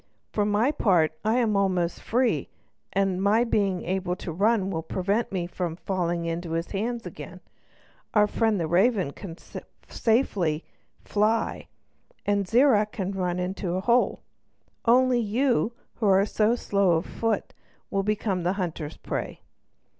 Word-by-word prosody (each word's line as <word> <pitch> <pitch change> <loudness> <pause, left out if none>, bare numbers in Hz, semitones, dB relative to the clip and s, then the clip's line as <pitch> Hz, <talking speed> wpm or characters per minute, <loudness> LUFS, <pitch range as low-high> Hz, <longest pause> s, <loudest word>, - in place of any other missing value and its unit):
For 210 - +1
my 210 +6 +2
part 180 - +3
I 220 +2 +2
am 225 -4 +2
almost 185 -3 0
free, 245 +2 0 0.4
and 195 -1 0
my 210 +4 +4
being 200 -6 0
able 185 0 -1
to 180 - -6
run 200 +2 +1
will 165 -3 -2
prevent 195 +7 -1
me 180 -3 -1
from 175 -1 -4
falling 175 -2 -2
into 165 0 -3
his 165 +1 -2
hands 230 +4 -2
again; - - -9 0.8
our 210 -1 +6
friend 215 -1 +1
the 165 - 0
raven 190 - +2
can 165 +1 -9
find - - -10 0.2
safety 220 - +1
in 150 - -6 0.4
flight, 215 +2 0 0.6
and 200 -1 +1
Zirac 225 -2 +4
can 190 -1 -3
run 180 -2 -1
into 180 0 -3
any 185 - -1
hole. 240 +4 +2 0.6
Only 250 +1 +4
you, 235 +2 +1 0.2
who 220 - 0
are 195 0 +5
so 215 +2 +2
slow 200 -6 +2
of 160 - -1
foot, 225 -3 -2 0.4
will 195 - +1
become 200 -2 -1
the 175 +2 0
hunter's 165 -5 -4
prey." - - -5
200 Hz, 155 wpm, -26 LUFS, 180-220 Hz, 0.8 s, our